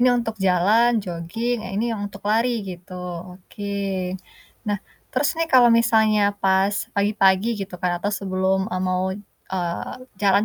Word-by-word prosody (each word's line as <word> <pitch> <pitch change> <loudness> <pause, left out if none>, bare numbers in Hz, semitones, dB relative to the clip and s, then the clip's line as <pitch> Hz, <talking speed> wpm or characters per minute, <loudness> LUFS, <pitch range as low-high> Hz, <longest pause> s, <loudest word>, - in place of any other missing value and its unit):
ini 250 - +5
untuk 230 -2 -2
jalan, 205 +7 +4
jogging, 215 +7 -3
yang 190 - -6
ini 215 - +1
yang 215 - -4
untuk 200 0 -13
lari 230 +3 +3 0.2
gitu, 185 -1 -9 0.4
oke. 190 +2 -13 1.0
Nah 205 -1 0 0.3
terus 270 +2 +2
nih 330 - +1
kalau 245 -2 +8
misalnya 220 -2 +4 0.2
pas 195 +1 +3 0.2
pagi-pagi 200 0 +3
gitu 190 -1 -8
kan 180 0 0
atau 205 - -1
sebelum, 190 -1 0
eee, 185 - -1
mau, 185 0 0 0.5
eee, 175 -2 -3 0.3
jalan 200 +1 +4
200 Hz, 150 wpm, -23 LUFS, 185-225 Hz, 1.0 s, kalau